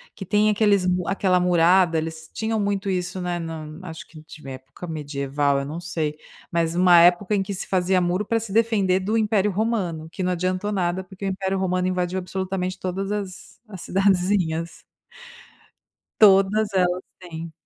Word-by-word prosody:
Que 195 - -7
tem 210 +3 +3
aqueles 205 -3 +2 0.2
aquela 190 -1 +1
murada, 175 -1 +4
eles 160 0 -6
tinham 220 0 -1
muito 200 -1 -1
isso, 180 0 -2
né, 175 -1 -2
na 165 -2 -6 0.2
acho 165 -3 -9
que 160 - -14
de 155 -2 -13
época 130 +7 -10
medieval, 145 -2 -1
eu 140 - -4
não 155 +4 -6
sei, 160 -3 -3 0.3
mas 165 -1 0
uma 175 -1 +6
época 180 +4 +4
em 195 - +1
que 200 +1 -5
se 185 - -5
fazia 185 0 +2
muro 180 +4 0
pra 230 +2 0
se 220 -2 -7
defender 205 -4 +2
do 205 +4 -2
Império 210 -2 +2
Romano. 185 -7 -2
Que 185 - -4
não 180 - 0
adiantou 185 +3 -1
nada, 185 -1 -1
porque 190 +1 -13
o - - 0
Império 190 0 -2
Romano 185 -1 0
invadiu 180 0 -1
absolutamente 185 0 -3
todas 190 +2 -3
as 200 -3 -6
as 190 -3 -8
cidadezinhas 180 -3 0 1.4
Todas 200 +1 +5
elas 180 -1 +1 0.2
têm. 165 -2 -8
185 Hz, 170 wpm, -23 LUFS, 170-195 Hz, 1.4 s, uma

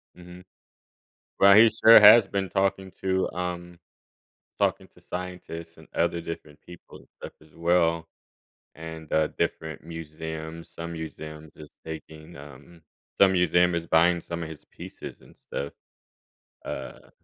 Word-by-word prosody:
Mhm. 90 0 -13 1.0
Well, 100 0 +7
he 115 +1 +8
sure 110 +1 +7
has 105 +1 +9
been 95 -1 -2
talking 95 -1 -1
to, 95 0 0
um 90 -1 -5 0.8
talking - - 0
to - - -22
scientists 90 -2 -6
and 80 - -16
other 85 0 0
different 80 -3 -9
people 90 -1 -14
and - - -21
stuff - - -9
as 75 -1 -21
well 85 -1 +1 0.7
and, 80 -1 -9
uh, 80 0 +3
different 80 -2 -4
museums. 80 0 -8
Some 85 0 -7
museums 80 -1 -9
is 75 -1 -14
taking, 80 +1 -10
um 75 +4 -14 0.4
some 95 -1 +6
museum 90 -1 +3
is 85 0 -3
buying 85 +2 +3
some 85 0 -6
of 80 - -7
his 80 - -11
pieces - - -10
and - - -19
stuff. 70 - -6 0.9
Uh 65 -2 -8
85 Hz, 140 wpm, -26 LUFS, 80-90 Hz, 1.0 s, has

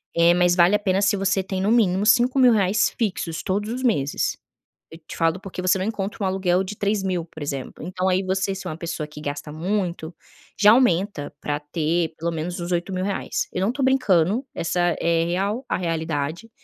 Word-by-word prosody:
eh, 170 +1 +5
mas 175 0 +3
vale 180 +3 +5
a - - +2
pena 195 -1 +1
se 205 0 +2
você 195 0 +1
tem, 190 0 -4
no 205 +3 +1
mínimo 205 -4 +3
R$5.000 230 -4 +4
fixos 180 -6 -2
todos 205 +3 -2
os 255 - -4
meses. 145 - 0 0.5
Eu 160 - -10
te - - -8
falo 165 +2 +1
porque 190 -2 -7
você 185 +1 +3
não 185 - -2
encontra 210 -2 -3
um - - +1
aluguel 185 -1 +1
de 200 +2 -6
R$3.000, 195 -4 -1
por 160 -2 -10
exemplo. 140 -2 -5
Então, 185 +1 -1
aí 185 +1 +1
você, 195 +1 -1
se 195 - -8
é - - -3
uma - - -5
pessoa 165 -2 -4
que 150 0 -11
gasta 145 +1 -5
muito, 175 -1 -3 0.5
já 210 +1 +7
aumenta 200 - +2
pra 145 0 -2
ter, 160 +2 -1
pelo 170 +1 -2
menos, 170 +2 -4
uns 175 +1 -4
R$8.000. 185 +2 -2
Eu 185 - -2
não 205 +5 +2
tô 270 +1 -3
brincando, 225 - +2
essa 170 +2 -2 0.2
é 165 0 +1
real 200 +8 -1
a - - 0
realidade. 165 +3 -3
185 Hz, 200 wpm, -23 LUFS, 165-205 Hz, 0.5 s, já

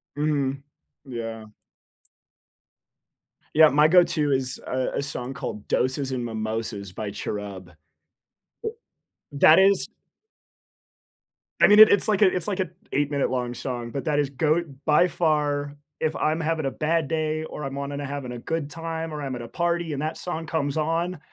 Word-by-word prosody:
Mhm, 140 -2 -1 0.4
yeah. 115 -4 -6 2.0
Yeah, 155 0 +8
my 150 +3 +5
go-to 160 -4 +4
is 130 -1 -1
a 130 0 -1
a - - 0
song 135 -2 -5
called 105 -4 -6
Doses 130 +1 0
and 125 -2 -2
Mimosas 110 -3 -4
by 105 +1 -4
Cherub. 100 -3 -6 0.9
U 445 - -2 0.6
that 155 +4 +7
is 195 +1 +4 1.7
I - - +7
mean, 210 +1 +6
it 215 - +11
it's 200 - +3
like 210 -1 +1
a 200 - +8
it's 180 +2 -2
like 200 -2 -2
a 185 - -1 0.2
eight-minute-long 135 -4 0
song, 120 -1 -4
but 140 - -4
that 150 -1 +1
is 145 - +1
GOAT 155 +5 +1 0.2
by 155 +3 +5
far. 145 -4 0 0.2
If 155 -1 -1
I'm 155 +2 0
having 160 -1 -1
a 135 - 0
bad 160 -1 0
day 155 -1 -1
or 150 - -7
I'm 135 -1 -4
wanting 140 0 -4
to 145 - -4
having 140 -2 -5
a 120 - -6
good 150 +2 -3
time 165 0 -5
or 150 - -5
I'm 135 -2 -3
at 120 - -6
a 115 - -7
party 170 +2 -1
and 140 - -3
that 155 +1 -3
song 165 -2 -5
comes 145 -4 -1
on, 165 +2 -1
145 Hz, 165 wpm, -25 LUFS, 130-160 Hz, 2.0 s, it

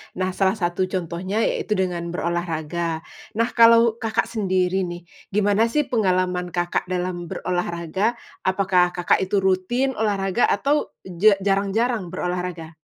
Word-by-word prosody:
Nah, 185 0 -1
salah 190 +2 +1
satu 180 -1 -1
contohnya 185 +3 -2
yaitu 215 - 0
dengan 180 -3 -1
berolahraga. 170 -1 -2 0.3
Nah, 230 +2 +1
kalau 230 -1 +5
Kakak 225 0 0
sendiri 190 -4 0
nih, 175 0 -7 0.3
gimana 205 +2 +3
sih, 300 +6 +1
pengalaman 185 -7 0
Kakak 175 +1 -1
dalam 180 -1 -3
berolahraga? 175 +5 -2 0.3
Apakah, 185 -2 +2
Kakak 175 -1 +2
itu 190 +2 0
rutin 190 +8 +1
olahraga? 205 -1 +1
Atau, 285 +8 0
ja 190 +3 +3
jarang-jarang 200 +2 0
berolahraga? 180 -2 -4
185 Hz, 125 wpm, -23 LUFS, 175-215 Hz, 0.3 s, kalau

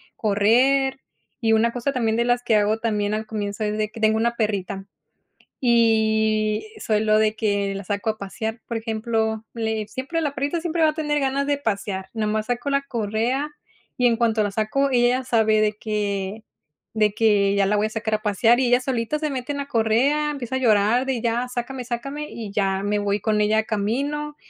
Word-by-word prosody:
correr 250 +6 +2 0.4
y 225 -3 +2
una 225 +1 +3
cosa 245 +3 -2
también 225 -4 0
de 235 - +2
las 245 0 +2
que 230 -2 +2
hago 210 +1 +2
también 210 -2 -1
al 215 0 -3
comienzo 210 -1 -3
es 210 0 -1
de 215 -1 -1
que 225 - -10
tengo 220 0 +3
una 235 +1 +1
perrita. 200 -3 -2 0.7
Y 220 - +2
solo 215 - +2
de 215 0 +2
que 200 -2 0
la 195 0 -6
saco 205 +3 -1
a 215 - -5
pasear. 220 +3 -5
Por 235 - -3
ejemplo, 220 -1 -2
le 220 -2 -2
siempre 260 +9 -3
la 295 -3 -2
perrita 285 +5 -1
siempre 335 0 -1
va 315 - +5
a - - -10
tener 295 -2 -1
ganas 275 +1 0
de 290 0 +1
pasear 200 -6 -3
nada 215 -2 -1
más 215 0 -1
saco 245 +3 -2
la 275 0 +1
correa 240 +3 -1 0.5
y 250 - +2
en 230 - +2
cuanto 225 -2 +2
la 205 - -1
saco, 220 +7 0
ella 245 0 +3
ya - - -9
sabe 220 -3 +3
de 210 0 +2
que 210 -1 -3 0.5
de 215 -1 +2
que 205 -2 +3
ya 200 -1 +3
la 210 +2 +2
voy 210 +1 +2
a - - -5
sacar 220 0 -2
a 215 - -2
pasear 225 +4 +3
y 260 - +2
ella 245 +1 +4
solita 250 +2 -1
se 305 0 -2
mete 260 0 -3
en 285 - -4
la 280 - -3
correa. 275 +5 +2
Empieza 260 -3 -4
a - - +1
llorar 230 +1 +3
de 260 -3 -1
ya 235 +1 0
sácame, 250 +1 -4
sácame 275 +5 -4
y 215 -4 -7
ya 195 -2 0
me 205 +1 0
voy 205 0 0
con 215 -1 +1
ella, 215 +1 +3
camino 280 +9 -2
225 Hz, 210 wpm, -23 LUFS, 215-255 Hz, 0.7 s, va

